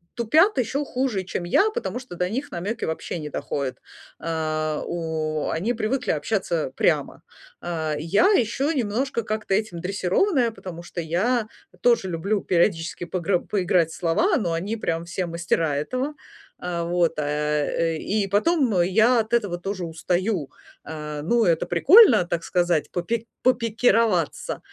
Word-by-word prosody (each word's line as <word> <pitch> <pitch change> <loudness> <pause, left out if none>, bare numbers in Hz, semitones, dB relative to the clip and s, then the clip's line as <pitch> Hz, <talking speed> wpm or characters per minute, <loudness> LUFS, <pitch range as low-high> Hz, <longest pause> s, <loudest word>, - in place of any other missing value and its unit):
тупят 310 - +3
ещё 265 +4 0
хуже, 255 -8 -2
чем 175 -1 -4
я, 390 - +3
потому 475 - -3
что 255 -9 -10
до 180 +1 -1
них 265 +7 -4
намёки 205 +7 -4
вообще 160 +1 -3
не 150 -1 -6
доходят. 135 -3 -3 0.4
Э, 155 -2 -2
у 160 -2 -2
они 195 +9 -1
привыкли 230 +3 -1
общаться 165 -4 -1
прямо. - - 0 0.4
Э, 160 -3 -2
я 165 +8 +3
ещё 270 - +1
немножко 240 -1 -1
как-то 215 -2 -2
этим 195 -4 -1
дрессированная, 205 - +1
потому 180 -6 -9
что 175 0 -7
я 210 +9 0 0.3
тоже 235 -6 +3
люблю 195 +5 -1
периодически 170 -1 0
погры 180 +1 0
поиграть 180 -5 +1
в - - -8
слова, 195 - +2
но 190 -11 0
они 185 +7 -2
прям 165 -6 -2
все 180 +1 -3
мастера 165 -3 0
этого. 255 - -2 0.5
Э, 175 -1 -2
вот, 175 0 +1
э, 150 +2 0
и 205 -1 -1
потом 220 - +2
я 220 +7 +4
от 220 +1 -8
этого 205 -7 +1
тоже 185 0 -4
устаю. 175 0 -1 0.3
Э, 150 -1 -6
ну, 230 +7 +2
это 165 -2 +2
прикольно, 295 - +6
так 170 -1 -3
сказать, 175 -3 0
попи 225 +6 -2 0.2
попикироваться, 230 - +2
э, - - -16
180 Hz, 150 wpm, -24 LUFS, 165-230 Hz, 0.5 s, прикольно